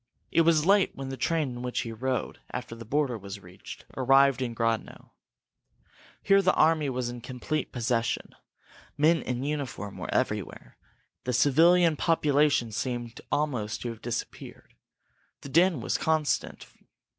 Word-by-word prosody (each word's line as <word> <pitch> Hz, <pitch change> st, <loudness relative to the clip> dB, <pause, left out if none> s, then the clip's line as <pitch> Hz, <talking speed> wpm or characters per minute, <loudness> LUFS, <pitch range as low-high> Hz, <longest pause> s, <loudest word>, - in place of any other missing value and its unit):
It 165 Hz, -, +4 dB
was 160 Hz, -2 st, +3 dB
late 200 Hz, +1 st, +3 dB
when 135 Hz, -1 st, -6 dB
the 135 Hz, -, -4 dB
train 150 Hz, +3 st, 0 dB
in 120 Hz, -1 st, -7 dB
which 125 Hz, 0 st, -2 dB
he 115 Hz, -, -5 dB
rode 130 Hz, +3 st, -3 dB
after 120 Hz, -2 st, -6 dB
the 115 Hz, 0 st, -9 dB
border 135 Hz, -2 st, 0 dB
was 100 Hz, 0 st, -8 dB
reached -, -, -12 dB
arrived 135 Hz, 0 st, +4 dB
in 120 Hz, -2 st, -3 dB
Grodno. 115 Hz, -1 st, -2 dB, 1.1 s
Here 195 Hz, 0 st, +5 dB
the 185 Hz, -1 st, +2 dB
army 155 Hz, -2 st, +3 dB
was 125 Hz, -2 st, -2 dB
in 120 Hz, 0 st, -7 dB
complete 130 Hz, +5 st, -4 dB
possession. 120 Hz, -2 st, -1 dB, 0.6 s
Men 160 Hz, +2 st, +4 dB
in 125 Hz, 0 st, -3 dB
uniform 140 Hz, -9 st, -4 dB
were -, -, -5 dB
everywhere; -, -, -2 dB, 0.5 s
the 125 Hz, -, -1 dB
civilian 160 Hz, +6 st, +4 dB
population 150 Hz, -7 st, +2 dB
seemed 120 Hz, +1 st, -4 dB
almost 130 Hz, -8 st, -1 dB
to 120 Hz, -, -3 dB
have 115 Hz, -1 st, -8 dB
disappeared. 120 Hz, 0 st, -6 dB, 0.7 s
The 140 Hz, -, -9 dB
din 170 Hz, -1 st, +3 dB
was -, -, -1 dB
constant. 155 Hz, -2 st, 0 dB
130 Hz, 145 wpm, -27 LUFS, 120-155 Hz, 1.1 s, Here